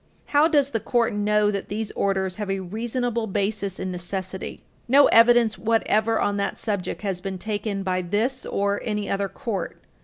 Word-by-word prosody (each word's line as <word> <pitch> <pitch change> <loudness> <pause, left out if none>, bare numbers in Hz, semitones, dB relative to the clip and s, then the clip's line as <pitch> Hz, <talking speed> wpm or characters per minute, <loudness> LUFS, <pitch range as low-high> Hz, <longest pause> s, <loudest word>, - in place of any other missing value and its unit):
How 290 +2 +6
does 290 -4 +2
the 225 - 0
Court 235 0 +1
know 210 0 +2
that 200 -1 -4
these 215 +1 -3
orders 190 -2 -1
have 210 -2 -4
a 195 0 0
reasonable 230 +4 -2
basis 200 -1 -2
in 185 - -3
necessity? 185 +1 -5 0.2
No 275 +3 +7
evidence 230 -1 +5
whatever 225 0 +2
on 205 0 0
that 200 - -2
subject 205 -2 -3
has 190 -3 -2
been 190 0 -4
taken 205 0 -3
by 185 -1 0
this 220 +9 -1
or 200 0 -1
any 210 -2 -2
other 195 0 -1
court. 215 -1 -4
205 Hz, 175 wpm, -24 LUFS, 195-230 Hz, 0.2 s, No